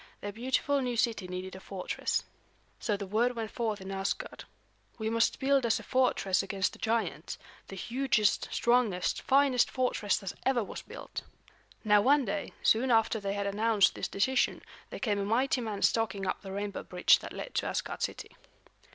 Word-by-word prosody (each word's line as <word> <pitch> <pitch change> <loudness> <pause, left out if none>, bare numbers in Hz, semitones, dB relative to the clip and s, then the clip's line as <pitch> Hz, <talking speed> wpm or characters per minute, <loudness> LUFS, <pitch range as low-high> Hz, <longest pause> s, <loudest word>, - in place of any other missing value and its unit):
Their 205 - -4
beautiful 260 +5 0
new 245 -2 -2
city 220 -5 0
needed 185 +1 -6
a - - -8
fortress. 190 -1 -2 0.6
So 210 -3 -1
the 200 - -5
word 230 +6 +1
went 225 -2 -4
forth 220 -3 -2
in 190 +1 -7
Asgard, 195 0 -3 0.5
"We 220 -1 -2
must 230 0 +2
build 275 0 +3
us 230 -2 +2
a - - -10
fortress 250 -7 +2
against 195 -1 -1
the - - -13
giants; 220 -9 -1 0.3
the 195 - -8
hugest, 235 -1 +1
strongest, 235 -7 +1
finest 270 -2 +3
fortress 250 -5 0
that 195 -3 -5
ever 260 -3 +2
was - - -7
built." - - -8 0.6
Now 210 -2 +5
one 275 +3 +4
day, 200 -1 -3
soon 245 +4 +3
after 225 -1 +3
they 200 -1 -2
had 200 0 -2
announced 205 0 +3
this - - -3
decision, 250 +6 +1 0.3
there - - -6
came 210 -5 0
a - - 0
mighty 250 +5 +1
man 215 -4 -4
stalking 205 -4 +1
up 185 - -2
the 195 - -8
rainbow 200 +1 -4
bridge 180 -1 +4
that - - -8
led - - -7
to - - 0
Asgard - - -3
city. - - -4
220 Hz, 180 wpm, -30 LUFS, 195-245 Hz, 0.6 s, Now